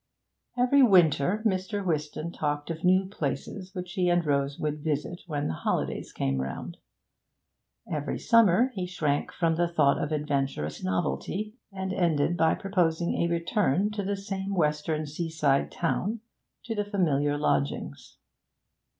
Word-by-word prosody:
Every 255 +3 +4
winter 185 - +4
Mr. 195 0 0
Whiston 155 0 -2
talked 145 -1 -2
of 165 0 -6
new 185 +1 +4
places 185 +2 -4
which 180 -1 -5
he 180 -3 +1
and 175 -1 +2
Rose 140 -1 0
would 150 -1 -3
visit 155 +3 -2
when 145 -3 -2
the 80 - -2
holidays - - -2
came 65 -1 -1
round; 65 +1 -5 1.1
every 150 -1 -2
summer 230 +2 +4
he 185 -4 -3
shrank 150 -5 -1
from 165 -2 0
the 175 0 +2
thought 150 -5 +2
of 150 - -3
adventurous 140 - -2
novelty, 95 - -2 0.2
and 190 -1 -4
ended 170 -3 +1
by 160 -2 +3
proposing 175 -4 0
a 170 - +2
return 180 - +1
to 210 -1 -3
the 200 +1 -2
same 195 0 -4
western 155 -1 0
seaside 150 -2 0
town, 205 +6 -1 0.4
to 230 - -3
the 210 -1 -1
familiar 145 -8 +1
lodgings. 70 - -2
170 Hz, 140 wpm, -28 LUFS, 145-190 Hz, 1.1 s, Every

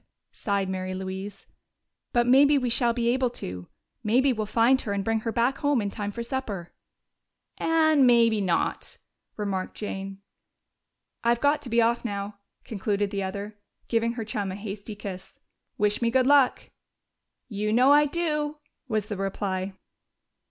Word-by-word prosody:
sighed 200 -2 -1
Mary 185 0 -3
Louise. 190 +2 -6 0.7
"But 240 0 +2
maybe 280 +4 +6
we 250 -3 -1
shall 235 0 +2
be 235 0 0
able 255 0 +2
to. 90 0 -6 0.4
Maybe 255 +5 +3
we'll 215 -2 -3
find 235 +5 +3
her 205 - -3
and 200 -1 -1
bring 225 0 +1
her 225 +1 -3
back 245 +4 +1
home 285 -3 +2
in 200 -2 -2
time 205 -1 -4
for 235 +3 -5
supper." 230 -9 -4 0.9
"And 315 -4 +4
maybe 230 -3 +4
not," 175 -4 -1 0.4
remarked 195 -3 -3
Jane. 195 -1 -6 1.0
"I've 235 0 +2
got 290 +3 +2
to 245 - -7
be 235 0 +3
off 235 +1 +1
now," 200 -2 -4 0.2
concluded 205 -1 -2
the 200 -1 -2
other, 200 +2 -5 0.3
giving 230 0 +1
her 230 -2 -5
chum 205 -3 -3
a - - -5
hasty 205 +1 -7
kiss. 190 -2 -8 0.4
"Wish 210 +2 +1
me 235 - +2
good 255 +1 +3
luck!" 280 -2 +3 0.8
"You 210 -2 -2
know 250 +5 +5
I 295 +1 +6
do!" 300 -2 -1 0.3
was 215 -4 -1
the 210 -2 -5
reply. 195 -1 -2
220 Hz, 160 wpm, -26 LUFS, 200-250 Hz, 1.0 s, maybe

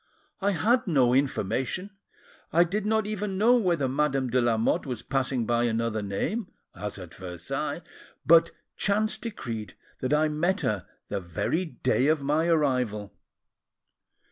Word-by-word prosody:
I 200 +1 +2
had 235 +7 +2
no 130 -8 +4
information, 135 - 0 0.6
I 170 +2 +5
did 200 +4 -2
not 220 -1 +2
even 210 -2 -3
know 230 +5 +5
whether 170 - +1
Madame 135 -2 0
de 125 +1 +3
Lamotte 115 +2 +1
was 125 -4 -4
passing 130 -3 0
by 120 +1 +2
another 115 -1 0
name, 165 - -2 0.2
as 105 0 -5
at 90 -3 -10
Versailles, 90 -2 -4 0.4
but 165 +1 +6 0.3
chance 215 +2 +1
decreed 115 - -6 0.2
that 130 - -2
I 150 +1 +4
met 175 +6 0
her 105 - -1 0.2
the 100 - -1
very 95 - -1
day 130 -4 0
of 155 -2 +2
my 150 +4 +1
arrival. 125 -10 +1
140 Hz, 145 wpm, -27 LUFS, 115-185 Hz, 0.6 s, but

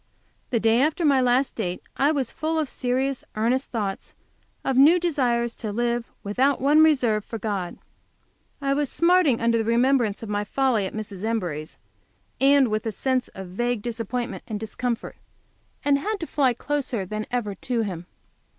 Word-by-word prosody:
The 235 - +1
day 225 +2 +3
after 315 +3 +1
my 275 -3 +4
last 250 +2 +2
date 180 -5 -3
I 280 +3 +3
was 270 -6 -1
full 320 +1 -2
of 310 -2 0
serious, 260 +1 -1
earnest 240 +5 0
thoughts, 205 -5 -4 0.5
of 270 - +1
new 300 +7 +7
desires 245 -8 0
to 215 -3 -4
live, 235 +2 -1 0.2
without 260 +7 +1
one 290 +4 +5
reserve, 250 -9 +3
for 225 - -6
God. 200 -5 -3 0.8
I 275 0 +1
was 285 -1 0
smarting 335 -7 +3
under 230 0 +2
the - - +1
remembrance 235 -1 +2
of - - -5
my 205 0 0
folly 235 -3 +1
at - - -9
Mrs. 205 -3 -6
Embury's, 175 -9 -3 0.6
and 275 -1 +5
with 215 +1 -1
a - - 0
sense 260 +3 0
of 190 -1 -7
vague 240 +3 -1
disappointment 235 +1 -3
and 215 -2 -4
discomfort, 230 +2 -4 0.7
and 280 -1 +4
had 420 +7 -2
to - - -2
fly 265 -6 +1
closer 255 -7 -2
than 215 +3 -4
ever 240 -5 -2
to 235 +4 -2
Him. 180 -4 -5
240 Hz, 170 wpm, -24 LUFS, 215-275 Hz, 0.8 s, new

